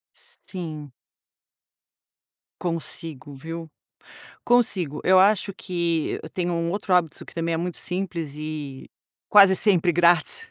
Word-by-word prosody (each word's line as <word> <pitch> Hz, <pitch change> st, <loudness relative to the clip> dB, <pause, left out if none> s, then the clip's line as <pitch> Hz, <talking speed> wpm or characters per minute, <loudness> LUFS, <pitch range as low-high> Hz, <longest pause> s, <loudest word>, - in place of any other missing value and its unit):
Sim. 180 Hz, -, -9 dB, 1.7 s
Consigo, 165 Hz, -4 st, -6 dB
viu. 165 Hz, +4 st, -8 dB, 0.8 s
Consigo. 195 Hz, -, +1 dB
Eu 185 Hz, +1 st, +5 dB
acho 200 Hz, 0 st, +3 dB
que 170 Hz, -4 st, -2 dB
eu 155 Hz, -, -8 dB
tenho 175 Hz, -1 st, -2 dB
um 170 Hz, 0 st, -1 dB
outro 195 Hz, 0 st, -1 dB
hábito 170 Hz, -4 st, 0 dB
que -, -, -15 dB
também 165 Hz, 0 st, -2 dB
é -, -, 0 dB
muito 175 Hz, +1 st, -4 dB
simples 175 Hz, -5 st, -4 dB
e 150 Hz, -3 st, -7 dB, 0.4 s
quase 195 Hz, -2 st, +7 dB
sempre 180 Hz, -3 st, +4 dB
grátis. 175 Hz, -, +2 dB
175 Hz, 120 wpm, -24 LUFS, 160-190 Hz, 1.7 s, quase